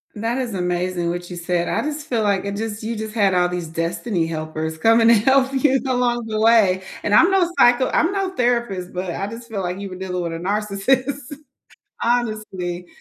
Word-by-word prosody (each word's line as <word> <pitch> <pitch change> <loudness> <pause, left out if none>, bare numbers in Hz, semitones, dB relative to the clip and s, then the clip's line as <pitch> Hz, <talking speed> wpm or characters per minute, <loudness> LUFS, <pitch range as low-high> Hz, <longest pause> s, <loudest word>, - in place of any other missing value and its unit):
That 230 +4 -2
is 240 -5 -3
amazing 180 -1 -1
what 175 +1 -4
you 180 - -6
said, 175 0 -1
I - - 0
just 305 +1 -4
feel 230 -5 0
like 200 -2 +1
it 200 0 -3
just 220 0 -4
you 225 +1 -3
just 215 0 -5
had 200 -4 +2
all 180 0 +3
these 175 -2 -4
destiny 165 +3 -2
helpers 160 0 -4
coming 225 +4 +4
to - - +8
help 265 +4 +3
you 270 0 +3
along 245 -2 0
the 215 -1 -2
way 215 -5 +4 0.2
and 205 - 0
I'm 345 - +6
no 380 -3 +3
psycho 245 +2 +5
I'm 335 +4 +2
no 390 -1 -1
therapist, 235 - -1
but 180 -1 -3
I 195 +4 -3
just 230 +2 -9
feel 200 -3 -3
like 180 +1 -3
you 200 -1 -6
were 185 - -8
dealing 180 -1 -4
with 165 -1 -3
a - - -4
narcissist, 245 +8 -1 0.7
honestly, 215 -7 -2
210 Hz, 210 wpm, -21 LUFS, 180-240 Hz, 0.7 s, to